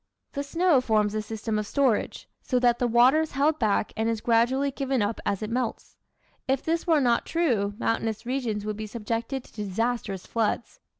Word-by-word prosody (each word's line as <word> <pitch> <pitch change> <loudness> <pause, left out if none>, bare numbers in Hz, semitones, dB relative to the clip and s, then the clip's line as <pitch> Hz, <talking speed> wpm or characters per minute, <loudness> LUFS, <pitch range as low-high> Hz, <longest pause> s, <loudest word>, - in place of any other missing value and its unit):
The 280 - -3
snow 320 0 +2
forms 215 -4 +1
a 215 - -1
system 220 0 -3
of 210 - -4
storage, 265 -4 0
so 255 - 0
that 245 -1 +3
the 245 - +2
water 245 +6 +5
is 320 - -4
held 295 +3 +2
back 210 -2 +1
and 220 +1 0
is 225 -1 -1
gradually 245 +5 +2
given 270 -4 -1
up 205 +2 -2
as 200 +1 -1
it 215 - -3
melts. 245 0 -3 0.5
If 265 0 +1
this 330 +2 -1
were 320 -3 +4
not 240 -3 +2
true 230 -12 0
mountainous 225 -1 -1
regions 235 -5 -2
would 215 -1 -3
be 215 0 -5
subjected 230 +4 -3
to - - -20
disastrous 205 -1 -2
floods. 230 0 -2
235 Hz, 190 wpm, -26 LUFS, 215-270 Hz, 0.5 s, water